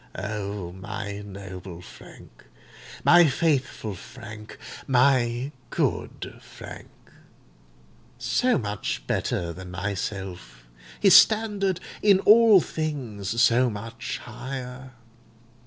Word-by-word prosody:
O 100 -2 -4
my 100 +2 -6
noble 95 -3 -9
Frank—my 155 - -1
faithful 135 -7 0
Frank—my 120 +4 -1 0.2
good - - -2
Frank! - - -11 1.3
so 255 0 +1
much 105 -6 -3
better 85 -1 -1
than 90 +1 -9
myself—his 90 - -2
standard 205 -4 +4 0.2
in 200 -2 +5
all 220 -1 +7
things 120 - -4
so 125 +1 +4
much 115 +3 -6
higher! 130 +1 -7
115 Hz, 75 wpm, -25 LUFS, 95-135 Hz, 1.3 s, all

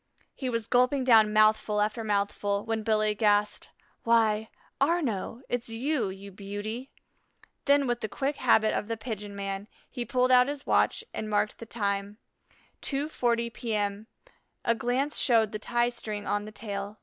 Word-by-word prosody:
He 260 - -4
was 230 -2 -2
gulping 255 +3 +2
down 220 -4 +6
mouthful 215 0 +3
after 215 +2 0
mouthful, 205 -1 -1
when 225 -1 -1
Billy 215 -1 +2
gasped: 210 -1 +1 0.3
"Why, 220 -2 +2 0.3
Arnaux, 270 - 0
it's 245 -1 -3
you, 235 -1 -1
you 195 +1 -9
beauty." 205 +6 -6 0.8
Then, 280 0 +4
with 240 -1 0
the 220 - -3
quick 275 +5 -2
habit 220 -3 +3
of 205 - -2
the 230 0 -3
pigeon 210 -3 -6
man, 195 0 -4 0.2
he 245 - -3
pulled 255 +1 +1
out 250 0 +6
his 285 -1 -4
watch - - +2
and 215 - -4
marked 210 0 0
the 230 - -9
time, 200 -2 -2 0.6
2:40 240 -5 -1
P.M. 210 -2 -2 0.6
A 235 - +4
glance 250 +5 -1
showed 225 -4 +3
the 215 - -4
tie 240 +2 +1
string 215 -3 -4
on 205 +1 -1
the 215 - -8
tail. 205 -1 -6
220 Hz, 160 wpm, -28 LUFS, 210-245 Hz, 0.8 s, down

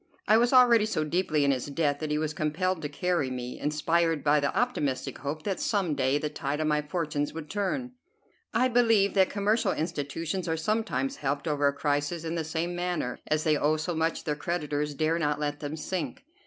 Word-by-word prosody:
I 215 - +6
was 235 +2 +4
already 240 -4 +6
so 155 -8 0
deeply 155 -2 +1
in 140 - +4
his 130 0 -2
debt 145 -1 0
that 155 - -3
he 150 - +1
was 155 0 -1
compelled 160 +4 -1
to 145 - -3
carry 160 -1 0
me, 125 -1 -5
inspired 160 +1 +1
by 150 0 +4
the 140 -1 0
optimistic 150 - -1
hope 145 +3 -4
that 195 -3 -2
some 195 -7 0
day 130 0 +1
the 150 - -2
tide 145 0 -3
of 155 - 0
my 150 -1 +2
fortunes 150 -1 -2
would 160 -2 -7
turn. 205 +6 -2 0.6
I 255 - +3
believe 225 -5 +3
that 190 -2 +4
commercial 210 +3 +1
institutions 160 +3 -3
are 160 0 0
sometimes 160 - -1
helped 145 +2 -2
over 145 -2 +2
a - - +3
crisis 145 +3 -1
in 165 0 -3
the 165 -1 -1
same 165 +2 -2
manner, 175 -8 -2
as 155 0 +1
they 155 -1 +3
owe 155 +2 +2
so 160 +3 -2
much 160 0 -1
their 150 - -1
creditors 150 -2 -2
dare 155 +3 +1
not 150 -2 0
let 145 -1 -2
them 145 +1 -5
sink. 185 - -4
155 Hz, 210 wpm, -28 LUFS, 145-180 Hz, 0.6 s, I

